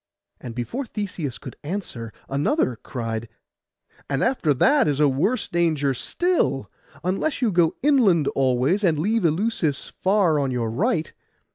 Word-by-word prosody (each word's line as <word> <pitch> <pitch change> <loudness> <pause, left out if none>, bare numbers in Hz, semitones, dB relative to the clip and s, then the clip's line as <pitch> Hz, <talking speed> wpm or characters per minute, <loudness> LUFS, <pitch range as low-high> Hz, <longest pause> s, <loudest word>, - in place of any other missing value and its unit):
And 120 -2 -8
before 235 - -4
Theseus 185 - -4
could - - -10
answer, 145 - -5 0.2
another 140 - +1
cried, 115 -1 -5 0.8
'And 135 -1 0
after 240 - +1
that 270 - +4
is 145 -1 0
a 150 - +5
worse 175 - 0
danger 155 -5 +1
still, 135 - 0 0.3
unless 195 - -1
you 240 -4 +1
go 175 -3 +3
inland 215 - +4
always, 135 +9 +1
and 165 -5 +3
leave 210 +5 +1
Eleusis 165 -3 0
far 185 -6 +3
on 140 -2 0
your 120 -3 -1
right. 170 - 0
160 Hz, 140 wpm, -23 LUFS, 135-210 Hz, 0.8 s, a